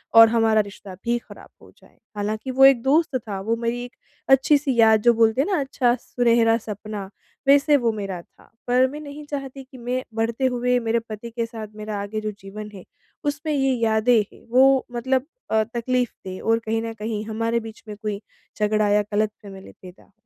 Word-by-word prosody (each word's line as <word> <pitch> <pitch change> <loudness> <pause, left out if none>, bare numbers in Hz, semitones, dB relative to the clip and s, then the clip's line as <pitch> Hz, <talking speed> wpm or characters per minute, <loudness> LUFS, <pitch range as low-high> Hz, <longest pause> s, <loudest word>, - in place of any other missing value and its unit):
और 225 0 +10
हमारा 225 -1 +3
रिश्ता 200 -1 -10
भी 235 0 +1
खराब - - -14
हो - - -17
जाए, - - -23 0.2
हालाँकि 215 +4 -3
वो 265 +1 +6
एक 270 -4 +6
दोस्त 295 +1 +2
था, 210 -5 -6
वो 225 +4 0
मेरी 235 +1 -2
एक 245 - -14 0.3
अच्छी 270 +2 +5
सी 280 -3 -2
याद 220 -1 +6
जो 240 +2 +5
बोलते 225 +2 +3
हैं 285 - -1
ना 365 - +2
अच्छा 265 -3 +1
सुनहरा 235 -2 +2
सपना 210 -2 -7 0.4
वैसे 285 +1 +5
वो 235 -4 +1
मेरा 195 -4 -5
था, - - -24 0.2
पर 250 +1 +4
मैं 295 - -7
नहीं 295 0 -9
चाहती 275 -2 -6
कि 260 0 -15
मैं 250 +1 -3
बढ़ते 230 +3 0
हुए 250 -1 +1
मेरे 230 0 0
पति 215 +2 -7
के 230 0 -2
साथ 225 -2 -8
मेरा 210 -1 -5
आगे 210 +2 -4
जो 215 0 -3
जीवन 210 +2 -8
है, 190 -3 -10 0.4
उसपे 295 +2 -2
ये 270 -2 +2
यादें 220 +1 +4
हैं, - - -19
वो 265 +2 +5
मतलब 255 +2 0 0.3
अ, 220 0 +3
तकलीफ 240 +2 -1
दें 185 0 -6
और 225 0 +2
कहीं 225 0 -2
न 225 0 -4
कहीं 215 0 -4
हमारे 230 +1 -1
बीच 225 -1 -11
में 210 - -7
कोई 210 -1 -4 0.4
झगड़ा 210 0 +2
या 205 +1 +4
गलत 215 +1 +1
फैमिली 195 -2 -11
पैदा 180 -1 -13
हो, - - -28
230 Hz, 205 wpm, -23 LUFS, 215-255 Hz, 0.4 s, और